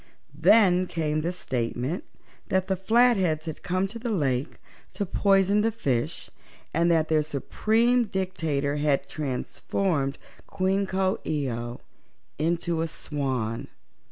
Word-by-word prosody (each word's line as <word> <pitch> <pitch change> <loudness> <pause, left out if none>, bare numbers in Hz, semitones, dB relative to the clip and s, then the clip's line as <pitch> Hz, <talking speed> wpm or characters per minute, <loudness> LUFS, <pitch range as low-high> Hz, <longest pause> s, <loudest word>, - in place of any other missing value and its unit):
Then 185 +3 +5
came 155 -3 -1
the 170 +3 -1
statement 130 -1 -3 0.4
that 190 0 +1
the 190 - +1
Flatheads 190 -6 +3
had 160 -2 -6
come 185 +1 0
to 220 +4 -6
the 240 +1 -3
lake 140 - -1 0.3
to 200 - -2
poison 195 +2 +3
the 225 - +2
fishes 130 - -2 0.4
and 170 +1 +3
that 160 -2 +3
their 155 -1 +3
Supreme 225 - +1
Dictator 160 -8 -1
had 145 -2 +1
transformed 140 +2 -2 0.3
Queen 190 +1 0
Coo 190 0 0
ee 145 -4 -1
oh 120 +1 -5 0.6
into 165 +1 0
a 165 - 0
swan. 130 -8 -3
165 Hz, 125 wpm, -26 LUFS, 145-190 Hz, 0.6 s, Then